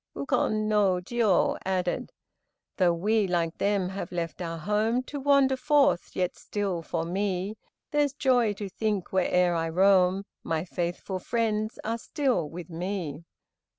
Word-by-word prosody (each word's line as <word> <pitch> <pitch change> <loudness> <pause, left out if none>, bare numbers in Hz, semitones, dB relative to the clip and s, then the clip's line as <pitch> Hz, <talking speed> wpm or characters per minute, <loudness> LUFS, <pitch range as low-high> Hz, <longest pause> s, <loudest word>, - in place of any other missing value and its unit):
Ukon 215 +9 0
no 210 -3 +3
Jiô 200 +2 +1
added: 185 -2 -1 0.7
"Though 180 -3 +4
we, 210 +4 +1
like 170 -2 0
them, 200 -2 +1
have 190 -2 -5
left 170 0 -4
our 165 -1 -3
home 215 +8 0
To 285 +2 -6
wander 275 -1 +4
forth, 290 - +2
yet 180 -1 0
still 195 -5 -3
for 165 0 -3
me 190 +2 -1 0.4
There's 290 -2 +2
joy 250 -6 +2
to 205 0 -6
think 205 -1 -2
where'er 180 -1 +3
I 165 -1 -1
roam 190 +2 +4 0.2
My 165 +1 -1
faithful 175 +1 -3
friends 215 0 -1
are 230 +1 -2
still 255 - 0
with 170 +1 -8
me." 170 -3 -4
195 Hz, 145 wpm, -27 LUFS, 175-220 Hz, 0.7 s, Though